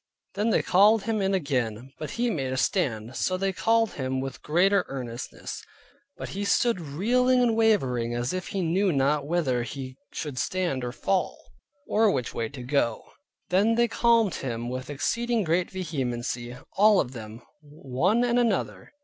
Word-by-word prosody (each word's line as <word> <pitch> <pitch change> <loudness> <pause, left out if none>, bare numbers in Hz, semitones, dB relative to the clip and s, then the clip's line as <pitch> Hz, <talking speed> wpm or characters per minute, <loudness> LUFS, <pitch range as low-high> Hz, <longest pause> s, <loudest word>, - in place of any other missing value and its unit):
Then 210 +3 0
they - - +2
called 205 +3 +5
him 225 -2 -1
in 195 0 +1
again, 130 - -2
but 155 - -5
he 240 0 +1
made 135 -8 -2
a 130 - -2
stand. 125 - -1
So 185 - 0
they 195 +1 -1
called 225 +2 +2
him 130 -1 -3
with 135 0 -5
greater 185 +5 +3
earnestness; 125 -3 -6 0.6
but - - -6
he 200 +2 -4
stood 230 +1 +2
reeling 240 - +2
and 240 -2 +3
wavering 130 - +2
as 120 +4 -2
if 185 -1 -4
he 195 -2 -2
knew 185 +4 +2
not 140 0 +1
whither 150 -7 +1
he 130 +2 -6
should 145 -5 -5
stand 175 -9 -1
or 120 - -3
fall, 185 +7 -1 0.5
or 220 0 +3
which 130 - -1
way 115 -1 -2
to 130 -3 -9
go. 125 -3 0 0.5
Then 205 +5 +3
they 235 0 +3
called 230 -3 +3
him 120 -2 -4
with 130 +1 -5
exceeding 230 - 0
great 170 +1 +1
vehemency, 125 -8 -4 0.2
all 210 0 +6
of 125 - -1
them, 110 -2 -9 0.2
one 150 - 0
and 245 0 +2
another. 235 +4 -1
160 Hz, 170 wpm, -26 LUFS, 130-205 Hz, 0.6 s, all